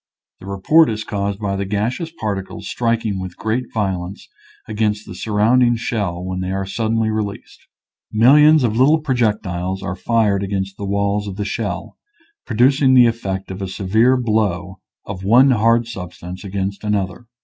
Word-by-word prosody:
The 95 - -12
report 150 +12 +4
is 110 -1 -3
caused 100 -2 -3
by 100 -2 -2
the 100 - -2
gaseous 110 - -2
particles 100 -3 -4
striking 115 -4 -1
with 95 -1 -7
great 115 +3 -1
vio 95 -5 -1
lence 95 - -11 0.4
against 105 -1 -1
the - - -9
surrounding 115 +5 +2
shell 100 -7 -3
when 95 0 -4
they 95 0 -3
are 95 0 -2
suddenly 110 +2 -1
released. 105 -2 -5 0.4
Millions 150 +6 +6
of 110 -3 0
little 140 +6 +4
pro 150 -3 -1
jectiles 95 -5 -1
are 95 -1 -3
fired 105 -1 +1
against 95 -1 -3
the 100 - -6
walls 100 +1 0
of 95 - -6
the 105 0 -3
shell, 100 - -4 0.5
producing 130 +3 +3
the 125 -1 +7
effect 95 -5 -2
of 95 +1 -7
a 95 - -3
severe 110 +7 +2
blow 105 -6 -1 0.3
of 95 -1 -7
one 125 +7 +5
hard 115 0 +3
substance 90 -3 -8
against 100 0 -4
another. 105 +2 -2
105 Hz, 165 wpm, -19 LUFS, 95-115 Hz, 0.5 s, the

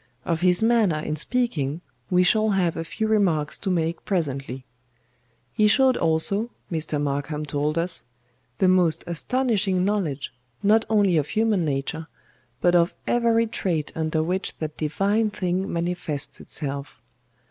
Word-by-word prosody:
Of 165 -1 -1
his 180 +3 +3
manner 225 -8 +3
in 155 0 -3
speaking 165 - -1 0.3
we 180 0 +4
shall 215 +4 +3
have 185 -4 +1
a 165 - -3
few 220 +6 -3
remarks 180 -9 +1
to 195 - -3
make 165 -2 -1
presently. 135 -8 -3 0.9
He 215 - +3
showed 260 +4 +4
also, 170 +8 +1 0.2
Mr. 155 -2 -1
MARKHAM 145 +1 -2
told 150 +2 -1
us, 165 -7 0 0.5
the 190 - +3
most 180 -4 +3
astonishing 195 0 0
knowledge, 165 -11 -2 0.3
not 215 +2 +4
only 200 -6 +3
of 150 -2 +1
human 215 -3 +1
nature, 150 +3 -3 0.5
but 175 - +3
of 170 0 +3
every 230 -1 +2
trait 175 -8 -2
under 160 0 -1
which 185 +4 -3
that 155 -1 -5
divine 200 +8 0
thing 190 -1 -2
manifests 170 -4 -2
itself. 140 -4 -6
175 Hz, 140 wpm, -24 LUFS, 155-205 Hz, 0.9 s, we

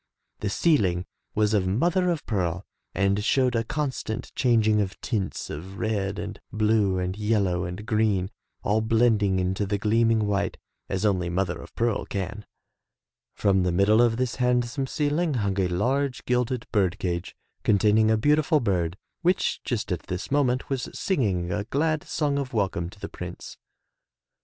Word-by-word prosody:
The 105 - -2
ceiling 95 - +2 0.3
was 105 0 +2
of 95 -3 +2
mother 175 - +2
of 165 -4 -2
pearl 95 -3 -1 0.3
and 100 +1 +1
showed 125 +2 +2
a 115 - +1
constant 130 -4 -3
chang 120 -4 +3
ing 105 -1 +3
of 95 -1 -4
tints 105 -6 -3
of 95 +6 -7
red 100 -3 -1
and 105 +1 -6
blue 105 -3 +2
and 90 0 -2
yellow 100 -4 +1
and 90 +4 -6
green, 105 -4 +1 0.3
all 105 +2 +2
blending 110 -3 +3
into 95 +2 0
the 100 +1 0
gleaming 110 +1 +2
white, 100 -1 -1 0.3
as 95 +2 -1
only 90 -4 +1
mother 90 +1 -1
of - - -12
pearl 115 -2 0
can. 100 +1 -4 0.9
From 95 -1 +2
the 90 -1 +1
middle 100 +5 +4
of 115 -1 +3
this 125 -2 -1
handsome 125 +2 +1
ceiling 150 +2 0
hung 100 -4 0
a 95 - +2
large 125 +9 0
gilded 125 -1 0
bird 95 -3 +1
cage 90 -1 -3 0.3
containing 105 +1 +4
a 110 - +4
beautiful 150 +5 +3
bird, 90 - 0 0.2
which 180 +1 +1
just 115 -4 -2
at 90 - -1
this 90 +6 -4
moment 130 -3 +1
was 135 -3 -2
singing 95 - 0
a 105 +2 -2
glad 155 +5 0
song 145 -3 0
of 135 -3 -4
welcome 95 -5 -1
to 100 - -16
the - - -5
Prince. - - -8
105 Hz, 165 wpm, -26 LUFS, 95-125 Hz, 0.9 s, middle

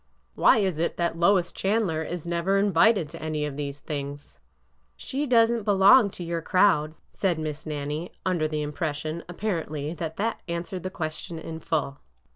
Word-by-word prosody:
'' - - -41
Why - - +5
is 190 -7 0
it 170 - -1
that 170 -1 -1
Lois 175 0 +3
Chandler 195 -6 0
is 170 +1 -5
never 170 +3 +1
invited 195 -1 +4
to 165 +1 -10
any 155 -1 -2
of 145 -2 -5
these 145 0 -5
things?" 145 -1 -6 0.6
She 280 - -3
does 230 -2 +5
n't 235 -2 -1
belong 200 +3 +6
to 180 - -5
your 170 0 -2
crowd," 165 -4 +3 0.2
said 185 -4 0
Miss 155 -1 -5
Nan 145 -2 -3
nie, 155 +4 -4
under 175 -4 +1
the 155 -1 -2
impression, 155 +1 -3
apparently, 165 -6 -3
that 160 -2 -5
that 225 +3 -1
answered 170 +2 -4
the 185 - -4
question 165 -1 -5
in 160 0 -7
full. 145 -4 -2
170 Hz, 180 wpm, -26 LUFS, 155-190 Hz, 0.6 s, belong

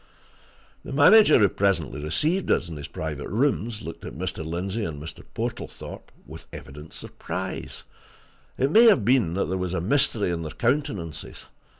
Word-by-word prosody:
The - - -8
manager, 155 +5 +7
who 105 - +5
presently 95 -8 0
received 155 - 0
us - - +2
in 80 - -6
his 70 -1 -7
private 75 -2 -5
rooms, 115 -2 0
looked 85 - -8
at - - -7
Mr. 90 0 -4
Lindsey 95 +7 -3
and 80 -6 -4
Mr. 80 +3 -8
Portlethorpe - - -6
with 80 +2 -11
evident 75 +3 -10
surprise - - -6 0.7
it 135 +2 +1
may 230 +5 +7
have 200 - +5
been 115 -9 +3
that 100 - 0
there 95 +1 -2
was 90 0 -2
mystery 105 +1 +2
in 85 -1 -2
their 75 -3 -6
countenances. 115 - -2
95 Hz, 160 wpm, -25 LUFS, 80-125 Hz, 0.7 s, manager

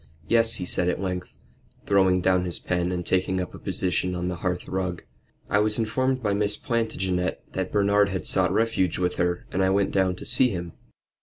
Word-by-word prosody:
"Yes," 115 -1 +3
he 90 - -4
said 90 0 +2
at - - -1
length, 90 -2 -4 0.5
throwing 95 -2 +3
down 90 0 +2
his 85 - -3
pen 90 0 -1
and 90 -1 -3
taking 95 0 0
up 90 - -4
a - - -10
position 90 0 -1
on 90 0 -2
the 90 - -4
hearth 90 +1 -3
rug. 90 -2 -3 0.4
"I 100 - +2
was 105 0 +2
informed 130 +3 0
by 105 -2 +1
Miss 105 0 +1
Plantagenet 95 -7 -1
that - - -3
Bernard 100 0 +3
had 95 -4 -3
sought 90 -2 +2
refuge 100 -4 +1
with 90 -1 -1
her, 90 0 -1
and 95 - 0
I 95 - +3
went 100 +1 +1
down 95 -2 +1
to - - -8
see 130 - +4
him." 85 -5 -5
95 Hz, 205 wpm, -25 LUFS, 90-105 Hz, 0.5 s, see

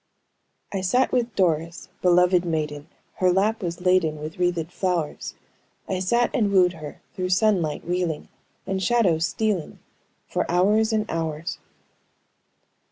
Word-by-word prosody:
"I 195 - -1
sat 245 +8 +2
with 240 -2 0
Doris, 170 -2 0
beloved 180 0 +4
maiden, 155 -3 -3 0.3
Her 185 -1 +3
lap 210 +5 +1
was 170 -1 -4
laden 180 -4 +2
with 155 +3 -7
wreathed 175 -2 0
flowers: 180 -5 -2 0.5
I 185 - -1
sat 235 +6 +1
and 210 -4 +1
wooed 180 -2 +4
her, 155 -3 -10
through 185 -1 -3
sunlight 185 -5 +1
wheeling, 175 -3 -2 0.4
And 190 0 -2
shadows 185 -8 +2
stealing, 210 -8 -2 0.5
for - - -2
hours 210 +5 +3
and 215 -1 +1
hours." 165 +2 -3
180 Hz, 130 wpm, -24 LUFS, 165-195 Hz, 0.5 s, beloved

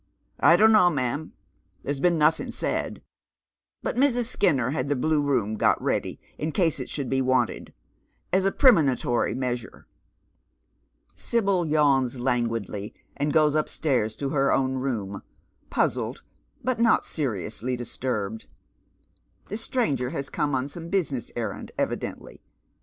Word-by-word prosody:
" - - -46
" - - -42
I 170 - +6
don't 220 +3 +6
know, 210 -5 +6
ma'am. 145 0 -2 0.5
There's 140 0 -3
been 175 +2 +3
notliing 155 +1 +2
said, - - -2 0.8
but - - -2
Mrsi 250 -2 +3
Skinner 150 - +1
had 150 - -2
the 145 - +1
Blue 150 +3 +1
Room 120 -7 0
got - - +3
ready - - -2 0.2
in 155 +1 -2
case 165 -7 +1
it 130 - -5
should 140 -3 -3
be 135 +1 +1
wanted, 130 -2 0 0.6
as 190 0 +3
a 195 - +2
premonitory 140 - +3
measure." 125 -2 -4 1.3
Sibyl 195 -7 0
yawns 135 -5 +2
languidly, 115 -5 -2 0.2
and 145 +1 -1
goes 150 -1 +4
upstairs 135 -7 0
to 140 - -3
her 135 -1 +2
own 130 -1 +1
room, 105 -7 -3 0.5
puzzled, - - -1 0.4
but 255 -2 -1
not 230 -1 +4
seriously 125 - -3
disturbed. 115 -3 -4 1.0
This 210 +3 -3
stranger 145 - 0
has 140 +1 -5
come 145 -3 0
on 130 +1 -1
some 165 +3 -8
business 155 -10 -1
en 115 -4 -2
and - - -9
evidently. - - -4
140 Hz, 140 wpm, -25 LUFS, 125-165 Hz, 1.3 s, I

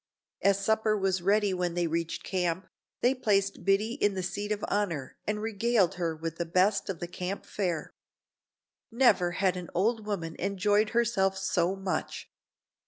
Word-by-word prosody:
As 200 0 +3
supper 220 -1 +2
was 190 -2 0
ready 200 +1 +2
when 180 -1 -1
they 175 -1 +1
reached 165 0 -2
camp, 180 -1 -1 0.4
they 245 +2 +4
placed 200 -6 0
Biddy 200 +4 +2
in 205 -1 +3
the 185 - -2
seat 205 +3 -3
of 210 -1 -1
honor 170 -10 -2
and 210 0 -1
regaled 220 -3 +2
her 170 -3 -2
with 165 +1 -5
the 170 - -1
best 185 +5 +2
of 190 - -2
the 175 - -4
camp 185 +2 -5
fare. 175 -6 -3 1.0
Never 225 -8 +3
had 185 0 +1
an 180 -1 -6
old 215 +4 +1
women 165 -6 -3
enjoyed 205 +3 +2
herself 225 -5 +1
so 190 -1 +1
much. 195 -1 -4
195 Hz, 165 wpm, -29 LUFS, 175-210 Hz, 1.0 s, they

